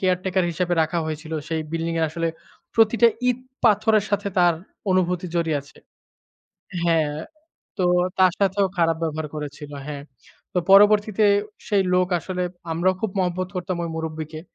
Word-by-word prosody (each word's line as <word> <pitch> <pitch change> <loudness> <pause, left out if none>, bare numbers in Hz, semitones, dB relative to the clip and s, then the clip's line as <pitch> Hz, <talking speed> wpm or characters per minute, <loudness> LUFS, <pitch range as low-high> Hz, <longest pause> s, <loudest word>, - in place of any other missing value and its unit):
Caretaker 185 0 +1
হিসেবে 175 +1 0
রাখা 165 +2 -1
হয়েছিল 155 +1 -6 0.2
সেই 160 -1 -1
বিল্ডিং 165 0 -2
এ - - +1
আসলে 165 0 -1 0.5
প্রতিটা 225 +1 +5 0.2
ইট 250 - +1 0.3
পাথরের 215 -1 +4
সাথে 200 0 0
তার 175 -1 +5 0.4
অনুভূতি 180 -1 +1
জড়িয়ে 165 -3 +1
আছে 140 - -19 1.1
হ্যাঁ, 160 -3 +2 0.6
তো 185 - +1 0.3
তার 185 -1 +5
সাথেও 195 0 +2
খারাপ 165 -1 +3
ব্যবহার 155 -1 -3
করেছিল 150 0 -7 0.2
হ্যাঁ। 145 -2 -6 0.5
তো - - +2
পরবর্তীতে 210 +1 +6 0.4
সেই 200 -2 +3
লোক 180 0 +3
আসলে 180 0 -4 0.3
আমরাও 180 +3 +2
খুব 220 - -1
মহব্বত 180 0 -1
করতাম 180 0 -2
ওই 165 - -4
মুরুব্বিকে। 155 -1 -5
180 Hz, 145 wpm, -23 LUFS, 160-195 Hz, 1.1 s, পরবর্তীতে